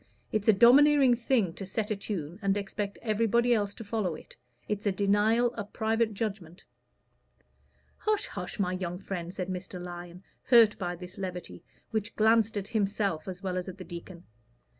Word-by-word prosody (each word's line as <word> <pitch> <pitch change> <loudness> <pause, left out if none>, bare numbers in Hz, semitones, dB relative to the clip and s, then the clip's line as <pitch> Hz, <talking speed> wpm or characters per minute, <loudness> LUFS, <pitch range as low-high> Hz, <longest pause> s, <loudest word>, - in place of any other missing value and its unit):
It's 215 0 -1
a - - +9
domineering 265 +5 +6
thing 235 -6 +1
to 195 - -8
set 210 +3 -3
a - - +1
tune 185 -4 -5
and 195 0 +1
expect 200 0 -4
everybody 230 +2 +2
else 205 -3 0
to - - -8
follow 205 -6 -2
it. - - -13 0.3
It's 210 0 -2
a - - +3
denial 210 +5 +2
of 205 -3 -7
private 220 -1 0
judgment." 195 -5 -5 1.3
"Hush, 425 -1 0
hush, 180 -3 -6
my 185 -3 0
young 180 -1 -3
friend," 180 -2 -5
said 185 -1 -4
Mr. 185 0 -5
Lyon, 175 0 -8 0.2
hurt 230 -4 +6
by 175 -1 -2
this 180 +2 -10
levity, 180 - -6 0.3
which 215 -2 -2
glanced 220 0 +3
at 200 0 -4
himself 200 -6 -1
as 185 0 -7
well 185 -1 -2
as 180 - -3
at 185 - -9
the 185 - -8
deacon. 175 0 -9
200 Hz, 175 wpm, -29 LUFS, 180-220 Hz, 1.3 s, a